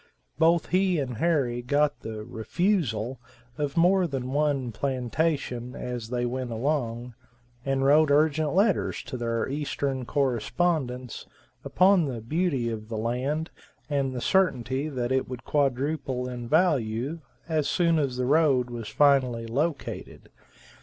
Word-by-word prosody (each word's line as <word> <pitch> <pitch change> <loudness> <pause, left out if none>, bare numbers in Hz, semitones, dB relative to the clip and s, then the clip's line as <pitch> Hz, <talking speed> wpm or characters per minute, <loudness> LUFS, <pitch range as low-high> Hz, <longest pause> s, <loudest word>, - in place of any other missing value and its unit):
Both 165 0 +3
he 185 -1 +2
and 130 -5 -3
Harry 135 -6 +1
got 145 +3 +1
the 110 -1 -6
"refusal" 130 - -1 0.4
of 145 +1 -3
more 180 +2 +4
than 130 -3 -4
one 145 -4 +1
plantation 130 0 -2
as 120 -3 -5
they 120 0 -1
went 125 +1 -3
along, 120 -1 -2 0.5
and 135 0 0
wrote 150 +2 +5
urgent 150 +1 +2
letters 200 -1 +1
to - - -7
their 115 -2 -1
eastern 140 -2 -2
correspondents, 130 0 -1 0.4
upon 185 -2 +4
the 125 -5 -4
beauty 140 +1 -1
of 110 -1 -6
the 110 - -3
land 130 +8 -2 0.4
and 140 -2 +1
the 125 -1 -4
certainty 135 -6 +1
that 125 -3 -3
it 130 -1 0
would 125 -2 -7
quadruple 135 -2 -1
in 120 -2 -6
value 145 -3 +1 0.3
as 155 -3 0
soon 170 -2 +2
as 135 -4 -1
the 125 - 0
road 135 -4 +3
was 115 -3 -6
finally 130 -5 +3
located. 140 +6 -3
135 Hz, 135 wpm, -26 LUFS, 120-155 Hz, 0.5 s, wrote